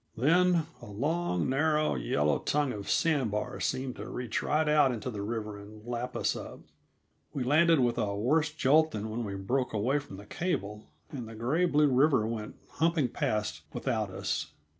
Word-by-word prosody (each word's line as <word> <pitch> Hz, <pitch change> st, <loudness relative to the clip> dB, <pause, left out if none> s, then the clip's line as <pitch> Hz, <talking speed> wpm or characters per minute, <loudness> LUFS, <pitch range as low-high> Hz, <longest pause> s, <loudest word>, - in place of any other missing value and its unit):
Then, 170 Hz, +5 st, +3 dB, 0.2 s
a 120 Hz, -, -10 dB
long, 135 Hz, -, -1 dB
narrow, 150 Hz, +3 st, +2 dB
yellow 70 Hz, +4 st, +1 dB
tongue 145 Hz, -3 st, 0 dB
of 100 Hz, -1 st, -6 dB
sand 150 Hz, -8 st, +2 dB
bar 105 Hz, +1 st, -3 dB
seemed 130 Hz, -1 st, -2 dB
to -, -, -7 dB
reach 125 Hz, -3 st, -3 dB
right 155 Hz, +1 st, +1 dB
out 150 Hz, -3 st, +4 dB
into 125 Hz, +1 st, -4 dB
the 105 Hz, -3 st, -5 dB
river 105 Hz, -1 st, -4 dB
and 105 Hz, +1 st, -13 dB
lap 120 Hz, +1 st, -4 dB
us -, -, 0 dB
up. -, -, -8 dB, 0.7 s
We 135 Hz, -, -1 dB
landed 155 Hz, +4 st, +4 dB
with 120 Hz, -1 st, +1 dB
a 100 Hz, -2 st, -1 dB
worse 150 Hz, +9 st, +2 dB
jolt 155 Hz, +1 st, +4 dB
than 110 Hz, -4 st, -5 dB
when 120 Hz, +2 st, -3 dB
we 100 Hz, -3 st, -4 dB
broke 125 Hz, +7 st, -1 dB
away 125 Hz, +7 st, +1 dB
from 135 Hz, -9 st, -10 dB
the 100 Hz, -, -11 dB
cable, 105 Hz, -, -3 dB, 0.2 s
and 125 Hz, -6 st, -6 dB
the 115 Hz, -, -9 dB
gray 135 Hz, +11 st, +1 dB
blue 150 Hz, -3 st, +4 dB
river 135 Hz, -3 st, +4 dB
went 110 Hz, -1 st, -4 dB
humping 160 Hz, -5 st, +1 dB
past 105 Hz, -9 st, -2 dB
without -, -, -1 dB
us. -, -, -2 dB
125 Hz, 185 wpm, -30 LUFS, 105-150 Hz, 0.7 s, out